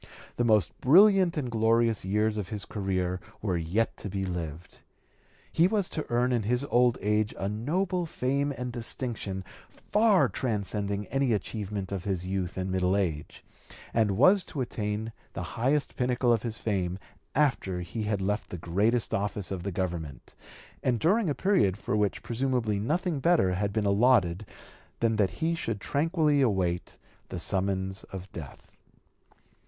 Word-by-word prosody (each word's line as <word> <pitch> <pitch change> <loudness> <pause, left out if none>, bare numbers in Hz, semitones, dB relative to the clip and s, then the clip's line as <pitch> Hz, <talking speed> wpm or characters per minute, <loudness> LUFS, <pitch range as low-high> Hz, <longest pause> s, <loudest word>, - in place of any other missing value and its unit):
The 120 - +2
most 105 -8 +3
brilliant 185 +3 +6
and 130 -5 -2
glorious 115 0 +2
years 105 +3 +1
of 105 -4 -4
his 105 -3 -4
career 95 -3 -2 0.2
were 95 -4 -1
yet 85 +7 0
to 100 - -6
be 95 0 -2
lived. 85 -2 -6 0.7
He 170 - +4
was 200 -2 +1
to 155 - -4
earn 120 +1 +2
in 120 -2 +2
his 120 +5 0
old 120 0 +4
age 105 0 +1
a 95 - -2
noble 170 - -1
fame 140 0 0
and 125 -2 -5
distinction 115 -5 -3 0.3
far 210 -3 +3
transcending 100 -3 -2
any 135 -2 +2
achievement 100 -1 -3
of 95 -2 -4
his 95 -3 -2
youth 95 -1 -3
and 95 0 -2
middle 95 +1 +2
age, 80 -7 -3 0.5
and 105 -4 +2
was 185 - +6
to 140 - -4
attain 110 -2 -3 0.2
the - - -4
highest 140 +4 0
pinnacle 125 -1 +2
of 115 - +1
his 115 -2 -4
fame 95 -4 -1 0.4
after 125 -11 +1
he 85 +5 -6
(p. 110 - -1
224) - - -2
had 100 -2 0
left 105 +2 -2
the 90 - -5
greatest 105 +8 +1
office 100 -1 -2
of 95 -2 -3
the 100 +3 -3
Government, 85 -6 -4 0.5
and 125 -3 +1
during 195 - +2
a 145 - 0
period 180 - +2
for 105 - -2
which 105 -1 0
presumably 120 -4 0
nothing 160 - -1
better 135 - +3
had 100 +2 -1
been 105 0 0
allotted 100 -3 +3 0.5
than 115 -1 +1
that 100 -3 +3 0.2
he 165 - +2
should 115 -10 -3
tranquilly 150 - +1
await 95 -8 0 0.3
the - - -5
summons 95 0 -1
of 95 -1 -9
death. 75 -6 -10
105 Hz, 165 wpm, -28 LUFS, 95-130 Hz, 0.7 s, brilliant